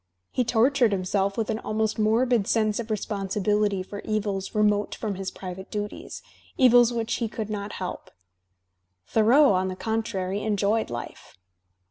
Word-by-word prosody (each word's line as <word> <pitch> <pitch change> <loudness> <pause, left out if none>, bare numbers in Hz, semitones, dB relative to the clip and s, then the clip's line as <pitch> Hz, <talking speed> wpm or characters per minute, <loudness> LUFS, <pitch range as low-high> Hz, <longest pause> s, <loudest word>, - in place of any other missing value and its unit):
He 250 - +1
tortured 240 +1 +3
himself 195 +1 0
with 225 -2 -1
an 220 - -2
almost 215 0 -1
morbid 225 0 +2
sense 215 -1 +1
of 235 -1 -5
responsibility 205 -1 0
for 200 +2 -8
evils 205 -3 -3
remote 210 -1 +2
from 215 -3 -3
his 190 0 -4
private 190 0 -8
duties, 210 0 -6 0.3
evils 245 -2 +6
which 230 -1 -2
he 230 -2 -2
could 215 -1 -5
not 205 0 -4
help. 185 -1 -6 1.0
Thoreau, 240 +5 +5
on 185 0 +1
the 185 - -4
contrary, 205 -3 -2
enjoyed 215 +1 0
life. 120 -5 -8
210 Hz, 145 wpm, -25 LUFS, 195-225 Hz, 1.0 s, evils